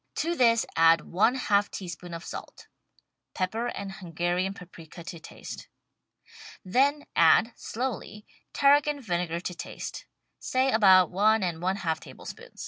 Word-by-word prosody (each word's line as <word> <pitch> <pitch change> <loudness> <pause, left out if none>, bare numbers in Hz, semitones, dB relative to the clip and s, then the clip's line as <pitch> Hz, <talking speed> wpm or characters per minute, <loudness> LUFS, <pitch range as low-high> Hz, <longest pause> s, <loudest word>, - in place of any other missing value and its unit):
To 335 +2 -1
this 230 -5 +4
add 165 0 +5
one 215 +8 +2
half 205 -5 +1
teaspoon 175 -2 -7
of 165 - -8
salt - - -9 0.3
— - - -53
pepper 220 +6 -1
and 200 -4 -5
Hun 185 -4 -10
garian 175 +3 -1
paprika 170 -2 -12
to 170 -1 -8
taste. - - -10 1.0
Then 275 +9 +2
add, 195 +8 +5
slowly. 215 -3 -5 0.3
Tarragon 290 +1 +3
vinegar 175 -7 -2
to 180 - -4
taste 175 0 -7 0.2
— - - -51
say 260 +1 +1
about 190 -5 +6
one 210 +3 +3
and 170 -3 -2
one 185 +2 0
half 165 -5 -2
tablespoons. - - -11
190 Hz, 145 wpm, -27 LUFS, 175-230 Hz, 1.0 s, about